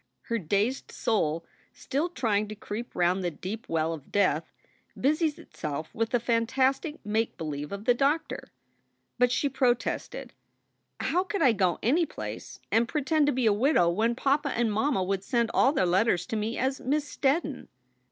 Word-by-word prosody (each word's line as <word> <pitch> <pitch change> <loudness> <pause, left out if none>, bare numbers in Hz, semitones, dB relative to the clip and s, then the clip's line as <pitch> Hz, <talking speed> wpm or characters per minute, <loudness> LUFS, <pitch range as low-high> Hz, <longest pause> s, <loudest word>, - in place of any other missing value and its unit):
Her 230 0 -1
dazed 205 - -1
soul, 165 -7 0 0.3
still 295 +6 -2
trying 215 -10 0
to 215 - -7
creep 215 +3 -6
round 180 +2 +2
the 175 - +1
deep 195 +7 -7
well 160 0 0
of 150 -4 -10
death, 175 -6 +1 0.5
busied 305 +2 +1
itself 155 - -6
with 225 0 -1
the 245 - +2
fantastic 260 +6 +1
make 220 +2 0
believe 150 -2 -4
of 200 +1 -6
the 245 - +5
doctor. 285 +5 -1 0.7
But 250 0 +4
she 285 - +1
protested: 250 -3 -1 0.7
"How 360 +2 +1
could 395 +1 -1
I 260 - +6
go 185 -5 +1
any 315 +8 +3
place - - -7
and 230 +1 +3
pretend 300 +2 +1
to - - +4
be 255 -2 0
a 215 - +5
widow 240 - +3
when 225 +6 +1
papa 280 +3 +1
and 230 -4 0
mamma 220 -2 +1
would 195 +1 -1
send 235 +1 0
all 265 - +5
their 235 - +1
letters 180 0 +2
to - - -4
me 220 +2 -2
as 265 +1 -1
Miss 290 +3 0
Steddon?" 285 0 -1
230 Hz, 170 wpm, -28 LUFS, 195-275 Hz, 0.7 s, I